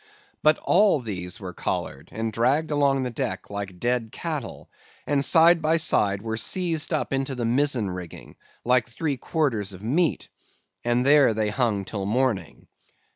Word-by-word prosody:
But 155 0 +4
all 195 -4 +4
these 90 -7 -6
were 95 -3 -7
collared, 70 -3 -4
and 110 0 -3
dragged 135 +8 +1
along 140 -2 +2
the 125 - -3
deck 125 -2 -4
like 100 -3 -6
dead 120 -1 -1
cattle; 150 -5 -5 0.4
and, 140 -1 +1
side 165 +2 +5
by 160 +1 +2
side, 100 -10 +2
were 110 -1 -3
seized 165 +5 0
up 155 -3 -1
into 135 0 -2
the 120 -2 -3
mizzen 125 -2 +1
rigging, 90 -3 -8 0.3
like 125 -2 +2
three 140 +4 -3
quarters 115 - -1
of 95 +2 -12
meat, 155 +8 0 0.6
and 120 +1 +1
there 140 -5 +5
they 110 -1 0
hung 110 -5 0
till 100 0 -4
morning. 110 - -1
125 Hz, 160 wpm, -24 LUFS, 105-145 Hz, 0.6 s, side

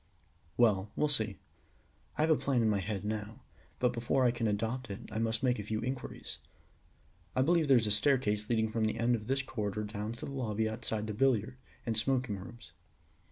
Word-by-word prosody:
"Well, 105 -4 +4
we'll 150 - +2
see. 110 -8 0 0.8
I - - +1
have 160 +1 +4
a - - +7
plan 135 -5 +1
in 110 - +3
my 100 - +1
head 100 +1 -3
now, 110 +1 -4 0.4
but 125 - +2
before 120 +2 +1
I 120 - +5
can 120 -1 -1
adopt 115 +4 -1
it 100 - -5
I 110 - -2
must 115 +1 0
make 125 -3 +2
a - - -3
few 110 +1 -2
inquiries. 130 +2 -4 1.0
I 130 - +4
believe 165 +1 +3
there 135 -2 +7
is 115 - +2
a 105 - 0
staircase 105 -3 +2
leading 110 -2 +2
from 110 -1 +1
the 110 +1 -1
end 115 +1 +2
of 110 -2 -2
this 135 +1 +1
corridor 105 -5 -3
down 105 +1 -4
to 115 - -7
the - - -6
lobby 110 -5 -1
outside 110 -1 -2
the 110 - -3
billiard 125 0 +2 0.3
and 115 - 0
smoking 125 -2 +1
rooms. 95 -2 -11
115 Hz, 205 wpm, -32 LUFS, 105-125 Hz, 1.0 s, a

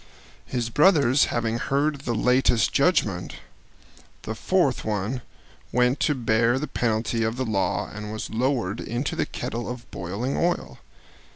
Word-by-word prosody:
His 120 -2 -2
brothers 145 -3 +5
having 115 0 -1
heard 140 +2 0
the 120 -4 -2
latest 125 0 +3
judgment, - - +1 0.9
the - - -4
fourth - - +1
one 110 +4 -2 0.5
went 125 +2 +2
to 150 - +2
bear 115 0 +2
the 145 - -2
penalty 115 -3 -1
of 115 0 0
the 130 - -1
law 105 -4 0
and 105 0 -6
was 110 - -5
lowered 115 -4 0
into 120 +5 -3
the - - -1
kettle 120 +1 -4
of 125 -1 -6
boiling 100 +10 -3
oil. 170 - -1
120 Hz, 145 wpm, -25 LUFS, 110-130 Hz, 0.9 s, brothers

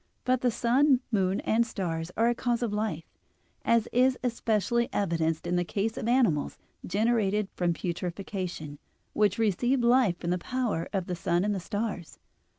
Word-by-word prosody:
But 255 0 +2
the 250 - +3
sun, 255 +3 +3
moon, 190 -3 +1
and 225 +2 +2
stars 170 -7 -3
are 230 - +3
a 240 - +3
cause 240 0 -1
of 225 -3 -1
life, 210 -7 -2 0.6
as 230 -1 +2
is 255 +1 +3
especially 235 -1 0
evidenced 165 -5 0
in 175 +1 0
the 175 - +2
case 200 +7 -2
of - - -4
animals 235 - +2 0.3
generated 210 0 +1
from 175 -1 0
putrefaction, 175 -4 -4 0.3
which 205 -2 +2
receive 240 +4 +1
life 235 -7 +4
from 175 0 -3
the 180 - 0
power 240 -6 -2
of 190 -4 -1
the 180 - -3
sun 175 +2 0
and 205 -3 -1
stars. 205 -3 -4
210 Hz, 160 wpm, -28 LUFS, 175-235 Hz, 0.6 s, life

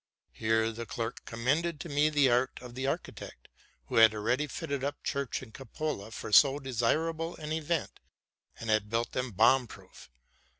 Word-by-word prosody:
Here 110 0 +1
the 115 +1 -7
clerk 115 -1 -5
com 115 0 -7
mended 155 +5 +1
to - - -6
me 145 0 +2
the 145 -3 +4
art 125 +2 +1
of 125 -1 -10
the 130 +2 -3
architect, - - -5 0.4
who - - -3
had 110 -1 +7
already 125 +8 0
fitted 140 0 -4
up 145 +1 -3
church 140 -3 -2
and 110 -4 -13
cupola 135 -4 -5
for 110 - -7
so 140 +5 +7
undesirable 155 +6 -1
an 155 -1 -7
event, 160 0 -2 0.6
and 115 -1 -2
had 110 -1 +1
built 115 +2 -1
them 125 0 -2
bomb 125 +5 +4
proof. 70 - -14
130 Hz, 175 wpm, -30 LUFS, 115-150 Hz, 0.6 s, had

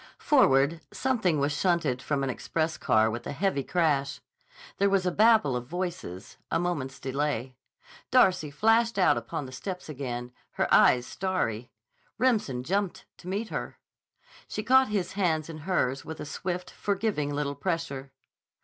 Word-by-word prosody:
Forward, 160 - +3
something 220 -11 +1
was 140 +1 +1
shunted 155 -7 +1
from 140 0 -1
an 135 - -1
express 160 +5 -2
car 110 0 +2
with 120 +1 -5
a - - -3
heavy 140 -3 0
crash. 140 -5 0 0.6
There 200 0 +4
was 195 -2 +2
a 180 - +2
babel 215 - +4
of 120 0 -4
voices, 175 - -5
a 165 - +1
moment's 145 -7 -3
delay. 135 -2 -2 0.5
Darcy 185 -11 +4
flashed 225 +7 +2
out 185 - +5
upon 135 +6 -4
the 130 - -9
steps 180 +6 -6
again, 125 -4 -5 0.2
her - - 0
eyes 125 -1 +6
starry. 125 - -2 0.5
Remsen 215 - +1
jumped 195 +5 -2
to 180 - -13
meet 205 +4 -2
her. - - -5 0.7
She 215 - -4
caught 260 +2 +5
his 205 -4 -1
hands 165 -5 0
in 155 - -8
hers 135 -7 +1
with 160 - -8
a - - -5
swift, 180 +5 -4
forgiving 195 -8 -1
little 145 0 -2
pressure. 145 -6 -3
160 Hz, 155 wpm, -28 LUFS, 135-190 Hz, 0.7 s, eyes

